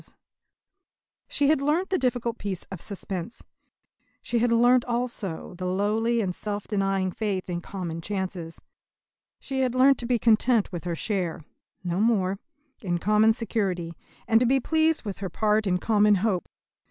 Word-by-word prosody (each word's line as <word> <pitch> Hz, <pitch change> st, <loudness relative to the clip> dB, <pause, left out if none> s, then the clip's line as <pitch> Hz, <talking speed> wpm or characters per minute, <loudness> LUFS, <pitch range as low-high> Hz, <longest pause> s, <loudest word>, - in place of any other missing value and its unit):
She 285 Hz, 0 st, +1 dB
had 310 Hz, -3 st, +3 dB
learnt 315 Hz, +7 st, 0 dB
the 375 Hz, -, +2 dB
difficult 240 Hz, -2 st, -1 dB
peace 195 Hz, -3 st, -4 dB
of 185 Hz, -4 st, -6 dB
suspense. 190 Hz, 0 st, -6 dB, 0.8 s
She 240 Hz, -, 0 dB
had 240 Hz, +1 st, +2 dB
learnt 245 Hz, +1 st, +5 dB
also 235 Hz, -8 st, -3 dB
the 180 Hz, +1 st, -5 dB
lowly 215 Hz, +5 st, +1 dB
and 185 Hz, -3 st, -1 dB
self 205 Hz, +1 st, -4 dB
denying 195 Hz, -2 st, 0 dB
faith 200 Hz, -2 st, -2 dB
in 175 Hz, 0 st, -3 dB
common 175 Hz, -3 st, -5 dB
chances. 185 Hz, -3 st, -4 dB, 0.8 s
She 270 Hz, -1 st, -4 dB
had 255 Hz, -2 st, +1 dB
learnt 265 Hz, +1 st, +5 dB
to 235 Hz, -, -3 dB
be 245 Hz, -1 st, +2 dB
content 230 Hz, 0 st, +3 dB
with 175 Hz, -1 st, -6 dB
her 175 Hz, -1 st, -2 dB
share 180 Hz, -4 st, -2 dB, 0.4 s
no 175 Hz, 0 st, -1 dB
more 200 Hz, -4 st, +2 dB, 0.4 s
in 175 Hz, -5 st, -1 dB
common 210 Hz, +4 st, +4 dB
security, 195 Hz, -8 st, -2 dB, 0.3 s
and 225 Hz, -, +5 dB
to 245 Hz, -, +2 dB
be 270 Hz, +2 st, +3 dB
pleased 320 Hz, +1 st, +1 dB
with 200 Hz, -2 st, -5 dB
her 195 Hz, -2 st, -4 dB
part 215 Hz, +3 st, +1 dB
in 180 Hz, -1 st, +2 dB
common 210 Hz, +1 st, +3 dB
hope. 195 Hz, -2 st, -1 dB
210 Hz, 160 wpm, -26 LUFS, 185-240 Hz, 0.8 s, learnt